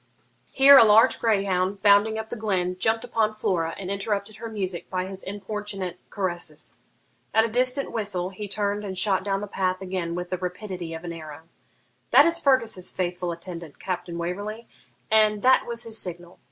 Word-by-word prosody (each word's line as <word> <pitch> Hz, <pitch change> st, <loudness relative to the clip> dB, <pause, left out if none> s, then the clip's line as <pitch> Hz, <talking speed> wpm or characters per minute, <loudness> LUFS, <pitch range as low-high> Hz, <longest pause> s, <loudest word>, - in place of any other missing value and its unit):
Here 275 Hz, 0 st, +8 dB
a -, -, +9 dB
large 220 Hz, +1 st, +5 dB
greyhound, 195 Hz, -3 st, 0 dB
bounding 205 Hz, +2 st, +5 dB
up 220 Hz, 0 st, -5 dB
the -, -, -4 dB
glen, 190 Hz, -5 st, -1 dB
jumped 225 Hz, +2 st, +1 dB
upon 220 Hz, -3 st, 0 dB
Flora 165 Hz, -6 st, -1 dB
and 190 Hz, -1 st, -5 dB
interrupted 200 Hz, +1 st, -3 dB
her 230 Hz, -, -7 dB
music 190 Hz, -5 st, -3 dB
by 185 Hz, -1 st, -2 dB
his 190 Hz, 0 st, -6 dB
importunate 200 Hz, -2 st, -5 dB
caresses. 185 Hz, -4 st, -4 dB, 0.6 s
At 220 Hz, 0 st, +5 dB
a -, -, 0 dB
distant 255 Hz, +4 st, +1 dB
whistle 195 Hz, -5 st, -2 dB
he 205 Hz, +2 st, -7 dB
turned 205 Hz, 0 st, -2 dB
and 190 Hz, -2 st, -5 dB
shot 190 Hz, 0 st, +2 dB
down 195 Hz, 0 st, -1 dB
the -, -, -3 dB
path 185 Hz, -2 st, -1 dB
again 180 Hz, -3 st, -3 dB
with 180 Hz, 0 st, -5 dB
the 185 Hz, -, -2 dB
rapidity 180 Hz, -2 st, -5 dB
of 160 Hz, -, -8 dB
an 170 Hz, -1 st, -5 dB
arrow. 155 Hz, -1 st, -9 dB, 0.7 s
'That 280 Hz, +4 st, +7 dB
is 335 Hz, 0 st, +4 dB
Fergus's 230 Hz, -, +1 dB
faithful 180 Hz, -1 st, -2 dB
attendant, 170 Hz, -2 st, -8 dB
Captain 180 Hz, -2 st, -4 dB
Waverley, 205 Hz, +7 st, -5 dB, 0.4 s
and 215 Hz, -1 st, +3 dB
that 260 Hz, +1 st, +4 dB
was 235 Hz, 0 st, -3 dB
his 225 Hz, -1 st, -1 dB
signal. 175 Hz, -1 st, -7 dB
195 Hz, 180 wpm, -25 LUFS, 180-220 Hz, 0.7 s, a